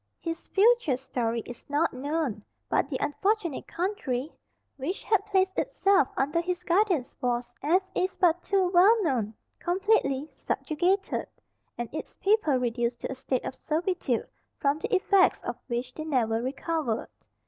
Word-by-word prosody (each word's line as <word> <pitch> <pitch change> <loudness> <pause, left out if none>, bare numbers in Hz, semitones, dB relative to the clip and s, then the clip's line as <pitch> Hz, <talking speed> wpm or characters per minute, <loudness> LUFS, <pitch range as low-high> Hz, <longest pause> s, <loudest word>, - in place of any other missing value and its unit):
His 330 -1 -5
future 415 - +4
story 235 -3 -2
is 245 +2 -11
not 295 +4 +1
known, 270 -5 -2 0.3
but - - +1
the - - -1
unfortunate 385 0 -1
country 325 - -2 0.4
which 290 +8 -4
had 425 -2 +2
placed 380 -2 +2
itself 390 -8 +3
under 295 +5 +1
his 360 +1 -3
guidance 355 - +1
was, 245 -1 -1
as 370 +5 +2
is 370 +1 0
but 350 -1 +3
too 385 -1 +2
well 400 +5 +6
known, 230 - 0 0.2
completely 350 -7 +1
subjugated, 360 +5 -1 0.5
and 240 - -3
its 310 - -6
people 400 -8 +2
reduced 240 -1 -1
to - - -3
a - - -1
state 260 0 -2
of - - -3
servitude, 315 -6 -1 0.3
from 285 +2 +1
the 345 - -4
effects 385 0 +4
of 240 - -3
which 250 0 -3
they 310 - -5
never 235 -7 +1
recovered. 275 -1 -2
315 Hz, 150 wpm, -28 LUFS, 255-375 Hz, 0.5 s, well